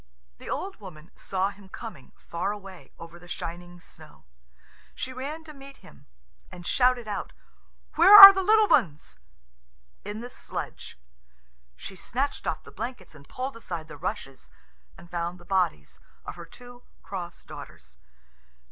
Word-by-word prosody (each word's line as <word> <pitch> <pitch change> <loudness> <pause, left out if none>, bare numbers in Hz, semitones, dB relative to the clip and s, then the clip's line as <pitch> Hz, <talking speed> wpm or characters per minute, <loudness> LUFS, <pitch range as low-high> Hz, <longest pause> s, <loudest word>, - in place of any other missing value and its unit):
The - - -10
old 390 +1 -4
woman 170 -6 -13
saw 190 +1 -2
him 200 -1 -17
coming, 195 - -10
far 170 +4 -4
away, 195 -3 -11
over 165 +1 -12
the 175 - -16
shining 175 +1 -7
snow. 155 - -18 0.7
She 260 - -5
ran 290 +5 -6
to 310 -1 -12
meet 275 -1 -13
him, 70 - -18 0.4
and 175 - -11
shouted 250 -1 +2
out, 205 - -5 0.6
"Where 380 +6 +9
are 395 0 +15
the 385 - -1
little 430 +2 +4
ones?" 155 - 0 0.8
"In 205 +2 -6
the 245 - -8
sledge." - - -8 0.8
She 190 - -10
snatched 265 +9 -3
off - - -3
the - - -14
blankets 240 -9 -7
and 140 -2 -17
pulled 260 +1 -5
aside 170 -8 -7
the 150 - -10
rushes, 145 -4 -6 0.5
and 175 - -14
found 175 +1 -4
the 175 - -17
bodies 180 - -1 0.3
of - - -6
her 170 0 -11
two 245 +5 -14 0.2
cross 175 -3 -7
daughters. - - -13
190 Hz, 150 wpm, -26 LUFS, 170-255 Hz, 0.8 s, are